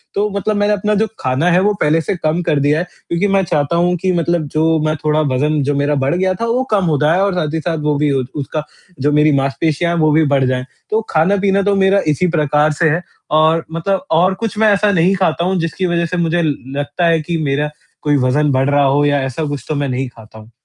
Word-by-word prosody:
तो 210 Hz, +1 st, 0 dB
मतलब 215 Hz, +2 st, -1 dB
मैंने 205 Hz, +1 st, +2 dB
अपना 210 Hz, +1 st, 0 dB
जो 220 Hz, -, +1 dB
ख़ाना 130 Hz, +7 st, 0 dB
है 180 Hz, -, +4 dB
वो 210 Hz, +2 st, +2 dB
पहले 160 Hz, +2 st, +2 dB
से 185 Hz, -, -2 dB
कम 160 Hz, 0 st, -1 dB
कर 150 Hz, -3 st, +1 dB
दिया 145 Hz, +3 st, +2 dB
है, -, -, -1 dB, 0.3 s
क्योंकि 170 Hz, +4 st, 0 dB
मैं 195 Hz, -1 st, +2 dB
चाहता 155 Hz, -2 st, -1 dB
हूँ 175 Hz, +1 st, +2 dB
कि 185 Hz, +2 st, -1 dB
मतलब 170 Hz, -2 st, 0 dB
जो 160 Hz, +1 st, +2 dB
मैं 155 Hz, 0 st, 0 dB
थोड़ा 155 Hz, 0 st, +2 dB
वज़न 150 Hz, +3 st, 0 dB
जो 145 Hz, +1 st, -1 dB
मेरा 145 Hz, +1 st, 0 dB
बढ़ 140 Hz, +6 st, +1 dB
गया 185 Hz, +1 st, +1 dB
था 230 Hz, -, +1 dB
वो 240 Hz, +3 st, 0 dB
कम 200 Hz, -3 st, +2 dB
हो 155 Hz, -3 st, +1 dB
जाए 160 Hz, +4 st, +3 dB
और 200 Hz, -1 st, +1 dB
साथ 155 Hz, -3 st, -2 dB
ही 160 Hz, -, -1 dB
साथ 165 Hz, 0 st, -2 dB
वो 150 Hz, -1 st, +1 dB
भी 150 Hz, 0 st, +1 dB
उसका, 140 Hz, +3 st, -3 dB, 0.4 s
जो 145 Hz, +3 st, +1 dB
मेरी 150 Hz, +1 st, +3 dB
मांसपेशियाँ 145 Hz, +5 st, 0 dB
हैं 170 Hz, -, -1 dB
वो 155 Hz, -, +3 dB
भी 155 Hz, +1 st, +3 dB
बढ़ 135 Hz, -1 st, +3 dB
जाए। 125 Hz, 0 st, -1 dB, 0.3 s
तो 220 Hz, +1 st, +1 dB
ख़ाना-पीना 195 Hz, +4 st, +2 dB
तो 200 Hz, 0 st, +1 dB
मेरा 195 Hz, 0 st, +3 dB
इसी 150 Hz, +4 st, +1 dB
प्रकार 150 Hz, +1 st, +2 dB
से 160 Hz, +1 st, +1 dB
है 165 Hz, +4 st, 0 dB, 0.4 s
और 160 Hz, +1 st, +2 dB
मतलब 185 Hz, +4 st, -2 dB
और 175 Hz, +4 st, +3 dB
कुछ 225 Hz, -1 st, -3 dB
मैं 215 Hz, 0 st, +4 dB
ऐसा 205 Hz, +1 st, +2 dB
नहीं 185 Hz, +1 st, +2 dB
ख़ाता 170 Hz, -2 st, 0 dB
हूँ 185 Hz, -1 st, 0 dB
जिसकी 165 Hz, +3 st, -2 dB
वज़ह 170 Hz, -1 st, 0 dB
से -, -, -2 dB
मुझे 170 Hz, 0 st, 0 dB
ल 155 Hz, -4 st, 0 dB, 0.2 s
लगता 145 Hz, +4 st, -1 dB
है 165 Hz, -1 st, +2 dB
कि 165 Hz, +2 st, -3 dB
मेरा 145 Hz, +1 st, -1 dB, 0.3 s
कोई 145 Hz, -1 st, +1 dB
वज़न 145 Hz, +3 st, +1 dB
बढ़ 130 Hz, +1 st, +1 dB
रहा 145 Hz, 0 st, +3 dB
हो 140 Hz, +2 st, +2 dB
या 145 Hz, -1 st, +1 dB
ऐसा 135 Hz, +4 st, -3 dB
कुछ 145 Hz, -1 st, -5 dB
तो 155 Hz, -, -1 dB
मैं 140 Hz, -1 st, -2 dB
नहीं 130 Hz, +1 st, -2 dB
ख़ाता 110 Hz, -2 st, -15 dB
हूँ। 110 Hz, +2 st, -15 dB
160 Hz, 255 wpm, -16 LUFS, 145-180 Hz, 0.4 s, है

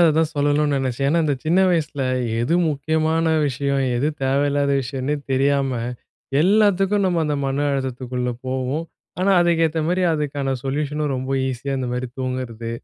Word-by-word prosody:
அதைதான் 160 Hz, -2 st, +4 dB
சொல்லணும்ன்னு 145 Hz, 0 st, +2 dB
நெனைச்சேன். 135 Hz, +1 st, -1 dB
ஏன்னா, 165 Hz, +3 st, +2 dB
இந்த 145 Hz, -2 st, +1 dB
சின்ன 170 Hz, +4 st, +3 dB
வயசுல 150 Hz, -4 st, -1 dB, 0.4 s
எது 155 Hz, +8 st, +1 dB, 0.2 s
முக்கியமான 160 Hz, +3 st, 0 dB, 0.2 s
விஷயம் 140 Hz, +1 st, 0 dB
எது 140 Hz, +5 st, +1 dB
தேவையில்லாத 140 Hz, +1 st, +1 dB
விஷயம்னே 135 Hz, +3 st, -2 dB, 0.2 s
தெரியாம, 135 Hz, 0 st, +2 dB, 0.7 s
எல்லாத்துக்கும் 200 Hz, +1 st, +3 dB
நம்ம 175 Hz, -2 st, +1 dB
அந்த 150 Hz, -1 st, 0 dB
மன 135 Hz, +2 st, 0 dB
அழுத்தத்துக்குள்ள 125 Hz, -2 st, -3 dB, 0.2 s
போவோம். 130 Hz, +5 st, -2 dB, 0.4 s
ஆனா, 195 Hz, -, +3 dB
அதுக்கேத்த 165 Hz, -2 st, +2 dB
மாரி 180 Hz, +1 st, +1 dB
அதுக்கான 140 Hz, -3 st, -2 dB
சொல்யூஷனும் 150 Hz, +1 st, -1 dB
ரொம்ப 130 Hz, +1 st, -4 dB, 0.2 s
ஈஸியா 130 Hz, +2 st, -3 dB
இந்த 125 Hz, -, -2 dB
மாரி 125 Hz, +1 st, -2 dB
தூங்குறது, 125 Hz, -3 st, -4 dB
145 Hz, 140 wpm, -21 LUFS, 130-160 Hz, 0.7 s, அதைதான்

